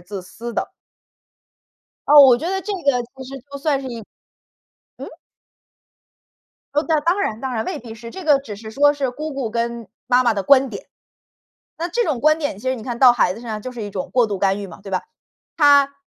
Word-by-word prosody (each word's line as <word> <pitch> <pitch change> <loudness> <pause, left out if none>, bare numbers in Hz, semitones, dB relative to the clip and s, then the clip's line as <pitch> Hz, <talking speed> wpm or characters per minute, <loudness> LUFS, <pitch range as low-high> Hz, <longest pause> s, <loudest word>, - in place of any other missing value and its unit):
自 190 +2 -8
私 230 +6 -8
的。 - - -2 1.4
哦， 290 0 +9
我 260 -3 +8
觉 320 +7 -4
得 385 +1 -1
这 410 +3 -4
个 280 -9 +1
其 265 - -8
实 270 +1 -8
就 280 - -7
算 280 -1 0
是 265 - -7
一 235 -2 -6 1.0
嗯？ - - -8 1.7
哦， 295 - +2
在 315 -2 +1
当 355 +4 +2
然 225 - -2
当 265 -2 -4
然 220 -1 -2
未 - - -4
必 225 -2 -10
是， 230 +1 -10
这 375 +7 -9
个 295 -3 +5
只 270 -6 -8
是 220 +1 -9
说 290 +4 +4
是 275 -3 -2
姑 305 +5 -6
姑 255 -5 -3
跟 235 -1 -3 0.2
妈 250 0 +4
妈 235 -3 +2
的 200 - -2
观 270 +3 +4
点。 200 - -8 0.9
那 340 - -2
这 475 +7 0
种 270 - -1
观 310 +2 +4
点， 285 -10 -3
其 255 - -4
实 260 - +1
你 225 - -9
看 240 -2 -4
到 250 -1 +7
孩 190 -6 +1
子 225 - -10
身 240 - -10
上， 215 -1 -4
就 255 - -6
是 240 -3 -7
一 205 - -5
种 190 -2 -5
过 245 -2 +3
度 205 -2 -4
干 195 +1 +1
预 200 - -6
嘛， 190 - -13
对 195 -1 -9
吧？ 185 - 0 0.5
她 285 -2 +5
255 Hz, 245 characters per minute, -20 LUFS, 220-285 Hz, 1.7 s, 哦